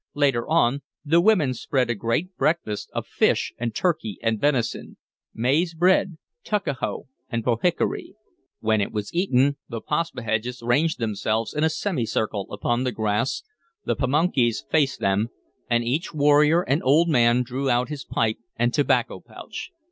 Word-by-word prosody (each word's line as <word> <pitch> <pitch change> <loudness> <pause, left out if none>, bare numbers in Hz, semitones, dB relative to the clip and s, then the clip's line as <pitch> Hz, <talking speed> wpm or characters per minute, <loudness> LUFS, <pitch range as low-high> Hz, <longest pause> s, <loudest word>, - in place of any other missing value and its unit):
Later 135 -5 +1
on, 140 -4 +2 0.2
the 165 +3 +4
women 175 -10 +3
spread 125 0 0
a - - +1
great 115 - -2
breakfast 155 -11 -1
of - - -4
fish - - +1
and 115 -2 -3
turkey 160 - -1
and 115 -2 0
venison, 135 -6 -1 0.3
maize 150 +9 0
bread, 180 0 +2 0.3
tuckahoe 195 - -2 0.2
and 115 -2 -2
pohickory. 125 +9 0 0.5
When 110 -1 +2
it 100 - -2
was 105 -1 -4
eaten, 140 -6 +2
the 115 -3 -4
Paspaheghs 125 -6 -2
ranged 145 +7 +2
themselves 110 0 -1
in 150 - -1
a 160 - +4
semicircle 115 - -2
upon 120 +4 -1
the 130 - 0
grass, 110 +3 -1 0.4
the - - 0
Pamunkeys 135 -4 +1
faced 145 -4 +2
them, 100 +4 +1 0.4
and 120 0 +2
each 140 +8 -2
warrior 150 +3 +4
and 145 +1 0
old 150 +6 +4
man 120 -5 +4
drew 130 +2 -3
out 125 +1 +1
his 150 -2 -5
pipe 110 -1 0 0.2
and 120 +1 +1
tobacco 145 - +1
pouch. - - -9
130 Hz, 150 wpm, -24 LUFS, 115-155 Hz, 0.5 s, the